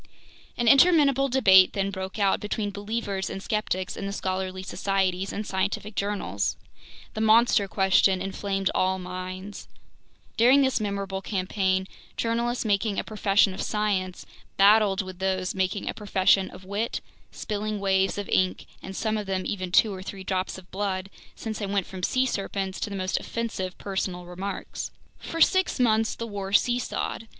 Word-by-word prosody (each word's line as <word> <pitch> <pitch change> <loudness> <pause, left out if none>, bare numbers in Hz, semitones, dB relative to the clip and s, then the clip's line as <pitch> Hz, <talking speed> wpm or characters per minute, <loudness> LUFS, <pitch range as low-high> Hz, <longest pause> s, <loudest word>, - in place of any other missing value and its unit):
An 240 - 0
interminable 275 -1 +5
debate 190 -8 +6
then 195 0 -1
broke 190 0 -5
out 200 -2 +2
between 210 0 -3
believers 205 -1 -3
and - - -5
skeptics 190 -4 -2
in 195 - -4
the - - -3
scholarly 185 -1 -3
societies 195 -1 -1
and 210 - -4
scientific 200 +3 -2
journals. 200 - -2 0.6
The 220 - -3
"monster 220 -2 +4
question" 190 -1 +3
inflamed 195 0 -2
all 185 0 +1
minds. 185 +2 -7 0.7
During 255 +5 +6
this 265 -2 +1
memorable 200 -2 -3
campaign, 190 -1 -1 0.3
journalists 235 +1 -1
making 205 0 +1
a - - 0
profession 205 -2 +2
of - - -5
science 200 -4 -1 0.3
battled 200 0 +5
with 185 -1 -9
those 190 -1 -1
making 190 +1 -1
a - - -1
profession 195 -2 +2
of 185 - -13
wit, 205 +4 -2 0.3
spilling 210 0 -3
waves 195 0 +1
of 205 - -4
ink 185 0 +1 0.2
and 190 - -8
some 220 +1 -1
of 205 - -6
them 190 -1 -1
even 185 -3 -3
two 210 +2 +4
or 185 - -7
three 190 0 -7
drops 185 0 -2
of 185 -1 -14
blood, 195 -1 -3 0.2
since 220 -1 -5
they 205 - -3
went 195 -2 0
from 190 -1 -8
sea 255 +7 +1
serpents 195 -4 -3
to - - -3
the 200 - -5
most 185 -1 -1
offensive 215 -6 -4
personal 185 -2 -3
remarks. 185 +3 -5 0.3
For 330 - -5
six 375 -5 +3
months 225 -2 +2
the 230 - -5
war 200 -3 -5
seesawed. 240 0 0
195 Hz, 160 wpm, -26 LUFS, 190-215 Hz, 0.7 s, debate